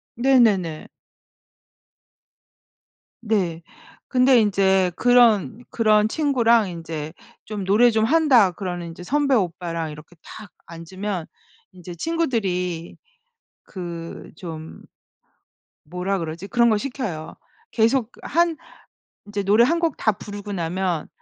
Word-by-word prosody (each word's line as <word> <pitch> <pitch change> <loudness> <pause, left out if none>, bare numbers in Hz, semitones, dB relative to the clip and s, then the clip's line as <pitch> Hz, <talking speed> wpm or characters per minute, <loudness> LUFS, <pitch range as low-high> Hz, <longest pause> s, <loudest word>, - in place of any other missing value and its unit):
네네네. 225 -11 +2 2.3
네. 185 -7 -1 0.5
근데 255 -1 +4
인제 195 -3 +2
그런 240 -2 +3
그런 215 -2 +3
친구랑 235 -6 +2
인제 160 -3 -6 0.3
좀 210 -3 -5
노래 220 +5 +4
좀 220 -1 +2
한다 265 - +4
그러는 175 -1 -5
인제 165 +2 -10
선배 280 +5 +1
오빠랑 170 -4 -2
이렇게 150 +3 -13
탁 210 -4 -11 0.2
앉으면 175 +2 -6 0.5
인제 180 -1 -10
친구들이 190 - -2 0.7
그 170 -3 -8
좀 160 -2 -9 1.0
뭐라 180 +5 -3
그러지? 165 +3 -6
그런 235 +1 +3
거 215 - +3
시켜요. 210 - -5 0.4
계속 230 +1 +2
한 340 +1 +1 0.7
인제 205 -1 -3
노래 210 +4 +5
1 330 +7 +1
곡 335 -4 -1
다 220 - +1
부르고 205 0 -8
나면 175 -2 -2
200 Hz, 205 characters per minute, -22 LUFS, 175-235 Hz, 2.3 s, 노래